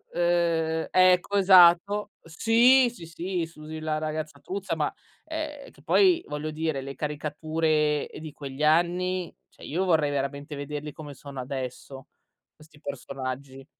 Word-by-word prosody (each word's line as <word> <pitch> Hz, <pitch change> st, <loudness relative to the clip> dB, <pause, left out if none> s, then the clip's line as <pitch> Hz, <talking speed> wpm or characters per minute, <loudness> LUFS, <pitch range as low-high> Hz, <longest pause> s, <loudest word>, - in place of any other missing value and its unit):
Uhm, 170 Hz, -2 st, +1 dB
ecco, 185 Hz, +2 st, +4 dB
esatto 190 Hz, +2 st, +6 dB
Sì, 235 Hz, +9 st, +4 dB
sì, 170 Hz, -, -11 dB
sì, 170 Hz, +1 st, -3 dB
Susy 155 Hz, -1 st, -9 dB
la 155 Hz, -1 st, -2 dB
ragazza 155 Hz, -1 st, -4 dB
truzza 190 Hz, +3 st, -4 dB
ma 150 Hz, -2 st, -1 dB, 0.3 s
ehm, 310 Hz, -3 st, -6 dB
che -, -, -21 dB
poi 360 Hz, -3 st, +4 dB
voglio 150 Hz, +1 st, -4 dB
dire 155 Hz, -3 st, -2 dB
le 135 Hz, 0 st, -7 dB
caricature, 150 Hz, +1 st, -1 dB
uhm, -, -, -8 dB
di 155 Hz, -1 st, -7 dB
quegli 140 Hz, 0 st, -6 dB
anni, 175 Hz, +3 st, +1 dB
cioè -, -, -18 dB
io 175 Hz, +6 st, -1 dB
vorrei 160 Hz, -5 st, +2 dB
veramente 140 Hz, +1 st, -3 dB
vederli 145 Hz, +1 st, -6 dB
come 150 Hz, -2 st, -9 dB
sono 140 Hz, 0 st, -8 dB
adesso, 130 Hz, +1 st, -6 dB, 0.5 s
questi 155 Hz, -1 st, -19 dB
personaggi. 135 Hz, -1 st, -6 dB
155 Hz, 140 wpm, -26 LUFS, 145-180 Hz, 0.5 s, esatto